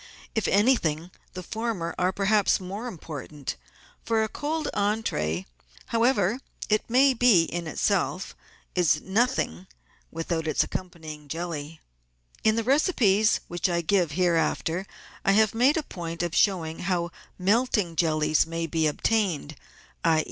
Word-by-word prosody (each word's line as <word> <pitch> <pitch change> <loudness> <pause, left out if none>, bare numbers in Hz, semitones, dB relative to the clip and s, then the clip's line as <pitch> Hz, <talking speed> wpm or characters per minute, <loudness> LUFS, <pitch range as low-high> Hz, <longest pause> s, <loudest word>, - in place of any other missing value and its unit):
If 220 - 0
anything, 185 - +2 0.2
the 185 - -6
former 215 -4 -3
are 180 +1 +2
perhaps 200 +1 +2
more 195 +6 -6
important, 150 - -6 0.5
for 225 -1 +1
a - - 0
cold 305 +7 -3
entree 150 - -1 0.2
— - - -24
however 230 -2 +2
perfect - - -11
it 215 +2 +1
may 265 +3 +5
be 230 -8 +5
in 170 0 -4
itself 185 +2 -1 0.2
— - - -33
is 170 -4 +3
nothing 190 - 0 0.4
without 165 0 -3
its 155 - +2
accompanying 160 -5 -7
jelly. 160 -1 -5 0.6
In 220 0 +4
the 230 - 0
recipes 230 - +3
which 175 +2 -1
I 170 -1 +1
give 170 -2 +1
hereafter 175 +1 0 0.4
I 195 - +3
have 215 0 +4
made 255 +7 +3
a 315 - 0
point 170 -7 -5
of 170 -1 -2
showing 165 -5 +1
how 175 -2 -1 0.3
melting 205 -2 +1
jellies 155 -1 +2
may 165 0 -3
be 160 0 +1
obtained, 165 -3 0 0.5
i. 160 -1 +4
180 Hz, 140 wpm, -26 LUFS, 160-220 Hz, 0.6 s, may